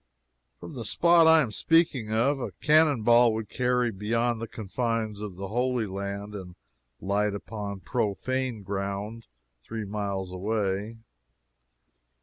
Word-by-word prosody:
From 85 - -9
the 120 - -5
spot 170 +8 +4
I 160 0 +7
am 125 -7 -2
speaking 145 -5 +2
of, 130 +6 +2
a 115 -7 -4
cannon 150 - +3
ball 120 0 +5
would 110 -2 -4
carry 125 -1 +1
beyond 115 +3 -1
the 115 - -4
confines 110 0 -3
of 105 -4 -6
Holy 120 +5 -1
Land 100 +1 -5
and 90 -3 -8 0.4
light 100 +1 0
upon 100 -2 -6
profane 120 +2 -2
ground 100 +3 -4 0.3
three 110 - -6
miles 100 -2 -3
away. 100 +2 -2
110 Hz, 130 wpm, -27 LUFS, 100-120 Hz, 0.4 s, I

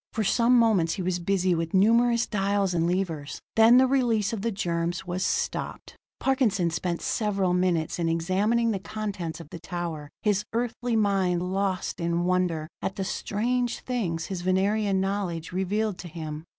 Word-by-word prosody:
For 220 - 0
some 240 +4 +4
moments 210 -8 +3
he 190 - -4
was 180 0 -1
busy 185 0 +1
with 165 +1 -2
numerous 235 +4 +4
dials 200 -2 0
and 170 0 +1
levers; 165 -6 -3 0.2
then 225 +2 +7
the 260 - +6
release 235 -6 +1
of 215 - -3
the 230 - 0
germs 175 -1 -2
was 180 +1 -2
stopped. - - -2 0.2
Parkinson 220 -10 +1
spent 170 +1 -2
several 195 -4 0
minutes 180 -3 0
in 165 -1 +1
examining 200 +8 +1
the 200 - -2
contents 195 -6 -5
of 165 -2 -12
the 170 - -7
tower, 170 -4 -5
his 205 -1 +2
Earthly 240 0 -1
mind 190 -4 +1
lost 195 -2 -1
in 170 0 0
wonder 180 -4 0
at 190 - -3
the 195 - -3
strange 240 +6 -1
things 175 -10 -2
his 190 -3 -4
Venerian 195 +2 +1
knowledge 190 -4 -2
revealed 195 +2 -1
to 180 - -7
him. 155 -2 -7
190 Hz, 165 wpm, -26 LUFS, 175-215 Hz, 0.2 s, then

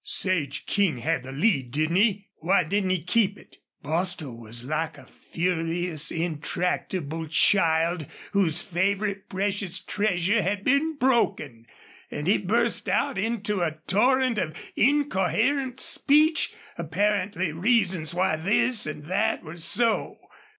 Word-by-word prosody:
"Sage 165 -8 -1
King 195 -9 +1
had 120 +2 -1
the 130 +1 -9
lead, 140 - +1
didn't 155 +6 0
he? 205 -1 +2
Why 185 +3 +2
didn't 195 +4 -1
he 185 -4 0
keep 205 +2 +1
it?" - - -18 0.3
Bostil 160 -3 -3
was 115 +1 -7
like 155 +3 -3
a 135 - -14
furious, 170 0 -2
intractable 165 0 -3
child 165 -1 +2 0.2
whose 175 -5 +1
favorite 200 +2 -1
precious 195 -1 -2
treasure 200 +1 0
had 195 +1 -2
been 285 +4 +2
broken; 200 - 0 0.4
and 150 - -5
he 195 - +3
burst 230 +4 0
out - - 0
into 210 -2 -1
a 160 -2 -1
torrent 250 +4 +2
of 155 -4 -3 0.2
incoherent 260 0 +1
speech, 305 +2 +3 0.3
apparently 190 +1 0
reasons 180 -3 +1
why 180 -3 +1
this 210 +5 +2
and 150 -1 -6
that 205 +6 0
were 155 +3 -9
so. 225 +7 +1
185 Hz, 130 wpm, -25 LUFS, 160-210 Hz, 0.4 s, he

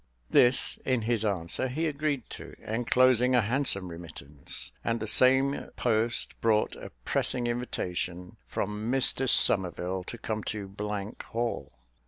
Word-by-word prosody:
This 125 +1 +4
in 130 -3 0
his 115 -1 0
answer 100 +3 +1
he 150 +6 -2
agreed 145 -4 -2
to, - - -9
enclosing 125 +2 +3
a 125 - +5
handsome 110 -5 0
remittance; 80 -4 -6
and 115 0 -1
the 110 - -3
same 130 +5 +3
post 115 0 0
brought 110 -2 +2
a - - -9 0.2
pressing 120 - +1
invitation 90 -7 -4
from 105 +3 -3
Mr 135 0 +2
Somerville 90 -2 +3
to 120 - -7
come 110 -2 -4
to 100 -2 -5 0.6
Hall. 115 +1 -3
115 Hz, 130 wpm, -28 LUFS, 100-125 Hz, 0.6 s, a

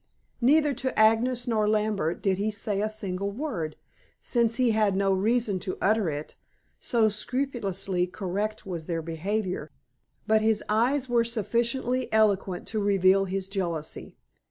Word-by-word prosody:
Neither 295 +4 +4
to 260 +1 -3
Agnes 235 +3 +3
nor 215 -3 +1
Lambert 210 -6 0
did 190 -1 +1
he 210 +2 0
say 205 -1 -2
a 215 - 0
single 200 -2 -3
word, 200 - -4 0.4
since 235 -2 +1
he 250 -2 +3
had 215 -3 +2
no 195 0 +2
reason 210 0 +1
to 185 - -4
utter 215 -3 +2
it, 150 0 -6 0.4
so 230 -2 +2
scrupulously 200 -6 -1
correct 205 +4 -3
was 170 -4 -5
their 165 -2 -2
behavior, 180 0 -3 0.6
but 220 0 +3
his 220 -1 +2
eyes 250 +6 +1
were 240 -1 +3
sufficiently 235 +3 -1
eloquent 200 -4 +2
to 215 -1 -1
reveal 195 -1 +4
his 190 0 -3
jealousy. 175 -6 -4
210 Hz, 145 wpm, -27 LUFS, 190-230 Hz, 0.6 s, Neither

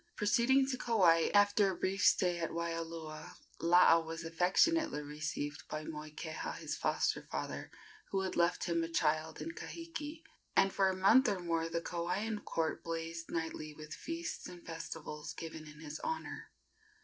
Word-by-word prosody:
Proceeding 240 +6 +4
to 255 -2 -2
Kauai, 175 -8 +4
after 205 0 +5
a 190 - -2
brief 195 +3 -1
stay 175 -1 +4
at 165 - -1
Waialua, 165 0 -4 0.2
Laa 170 0 +6
was 165 0 -5
affectionately 180 - +2
received 150 0 -4
by 155 0 -3
Moikeha, 155 +1 -5
his - - -4
foster - - +1
father, - - -4 0.4
who 195 - 0
had 190 -1 -2
left 170 +1 +2
him 170 -1 +1
a - - -1
child 160 -1 +1
in 165 - -4
Kahiki, 330 - -7 0.3
and 195 - +4
for 195 -1 +3
a 190 - -1
month 225 +7 +6
or 200 - 0
more 165 -1 -1
the 165 0 -1
Kauaian 185 +6 -2
court 160 -1 -1
blazed 165 0 -4
nightly 160 -2 -3
with 155 0 -8
feasts 330 +1 -5
and 175 -1 -11
festivals 160 -2 -6
given 160 -1 -7
in 150 0 -12
his 155 0 -6
honor. 320 0 -4
170 Hz, 160 wpm, -34 LUFS, 160-195 Hz, 0.4 s, Laa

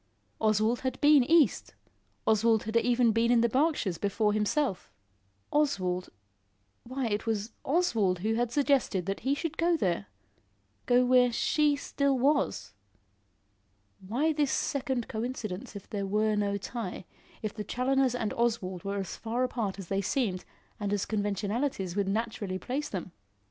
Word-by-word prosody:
Oswald 215 +2 +2
had 260 -1 -3
been 295 -2 +6
east, 305 -2 +3 0.5
Oswald 220 0 +3
had 220 +1 -5
even 240 0 +3
been 230 +2 +2
in 240 -1 +5
the 235 - +4
Berkshires 255 - 0
before 210 +1 +1
himself. 215 0 0 0.6
Oswald 185 -12 0 0.7
Why 255 +2 -4
it 215 0 -2
was 220 0 -1
Oswald 230 - +1
who 220 - +2
had 235 +1 0
suggested 270 - +1
that 195 +1 -2
he 270 +4 0
should 315 +1 -4
go 340 0 +3
there 175 - -1 0.8
go 250 +1 +4
where 250 -1 +5
she 295 +5 +2
still 280 -1 0
was. 280 - +1 1.3
Why 255 +12 0
this 295 -2 +1
second 260 -4 -1
coincidence, 220 -2 -5
if 200 - -9
there 200 -2 -3
were 215 +2 +1
no 200 -1 0
tie 200 -3 -6 0.4
if 215 - -2
the 215 - -5
Challoners 255 +3 +1
and 225 -3 -2
Oswald 205 -7 -1
were 200 0 -3
as 195 -2 -4
far 235 +3 -2
apart 225 -6 -2
as 195 -4 -9
they 195 0 0
seemed 200 -3 -1 0.3
and 205 -1 -2
as 205 -2 0
conventionalities 205 -1 -2
would 200 -1 0
naturally 215 -2 -2
place 270 +9 -3
them. 185 -2 -5
225 Hz, 150 wpm, -29 LUFS, 200-260 Hz, 1.3 s, been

